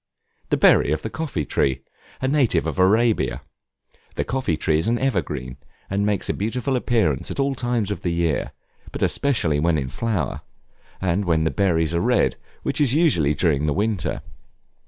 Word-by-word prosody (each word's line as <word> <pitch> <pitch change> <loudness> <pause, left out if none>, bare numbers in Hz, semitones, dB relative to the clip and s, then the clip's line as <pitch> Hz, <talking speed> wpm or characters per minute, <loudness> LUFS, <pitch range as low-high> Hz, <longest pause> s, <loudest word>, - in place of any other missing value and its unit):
The - - +2
berry - - +5
of 75 0 -1
the 110 - -4
coffee 145 - -3
tree, 65 -1 0 0.4
a 130 - 0
native 135 -3 +2
of - - -3
Arabia. 110 +5 +2 0.7
The - - 0
coffee 125 - -1
tree 80 0 +1
is 80 - -1
an 120 +1 +2
evergreen, 75 - -2 0.3
and 100 +1 +1
makes 105 -2 -1
a - - 0
beautiful 125 +6 -2
appearance 115 - 0
at - - -5
all 135 0 +1
times 120 -5 -1
of 100 - -4
the 90 - -1
year, 85 -3 0 0.4
but - - -3
especially 100 - +1
when 80 +1 +2
in 65 -3 -2
flower, 105 - -2 0.6
and 95 +2 0
when 80 -2 +2
the 80 - +1
berries 80 0 +1
are 85 - +1
red, - - +2 0.3
which - - -1
is 140 -2 +3
usually 85 - +3
during 75 -2 +1
the 75 - +1
winter. 105 -3 -1
95 Hz, 175 wpm, -22 LUFS, 80-120 Hz, 0.7 s, berry